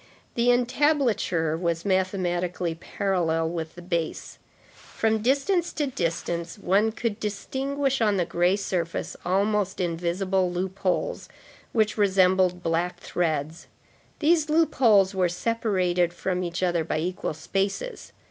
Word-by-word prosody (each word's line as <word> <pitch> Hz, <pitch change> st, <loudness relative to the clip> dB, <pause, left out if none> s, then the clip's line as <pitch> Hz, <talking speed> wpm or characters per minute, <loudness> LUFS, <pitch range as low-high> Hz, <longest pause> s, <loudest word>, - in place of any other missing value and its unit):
The 235 Hz, +1 st, +2 dB
entablature 245 Hz, -, +1 dB
was 170 Hz, 0 st, -2 dB
mathematically 180 Hz, -2 st, 0 dB
parallel 165 Hz, -2 st, -1 dB
with 160 Hz, -2 st, -5 dB
the 175 Hz, -, -10 dB
base. 170 Hz, -3 st, -3 dB, 0.3 s
From 220 Hz, 0 st, -1 dB
distance 285 Hz, -, +1 dB
to 300 Hz, -, 0 dB
distance, 170 Hz, -6 st, -3 dB
one 200 Hz, +3 st, +2 dB
could 225 Hz, -1 st, -3 dB
distinguish 270 Hz, +6 st, -2 dB
on 210 Hz, -3 st, +3 dB
the 175 Hz, -, +1 dB
gray 175 Hz, +3 st, +2 dB
surface, 180 Hz, -4 st, -3 dB
almost 200 Hz, +1 st, 0 dB
invisible 180 Hz, +2 st, 0 dB
loopholes 190 Hz, -, -2 dB, 0.4 s
which 215 Hz, -1 st, +1 dB
resembled 185 Hz, -2 st, +3 dB
black 165 Hz, +2 st, -1 dB
threads. 160 Hz, -1 st, -2 dB, 0.5 s
These 315 Hz, 0 st, +2 dB
loopholes 240 Hz, -, +4 dB
were 185 Hz, -2 st, +2 dB
separated 180 Hz, -4 st, 0 dB
from 185 Hz, 0 st, -2 dB
each 175 Hz, +1 st, -3 dB
other 175 Hz, -2 st, +1 dB
by 155 Hz, -, -2 dB
equal 175 Hz, -1 st, -3 dB
spaces. 195 Hz, -, -3 dB
185 Hz, 120 wpm, -26 LUFS, 175-220 Hz, 0.5 s, loopholes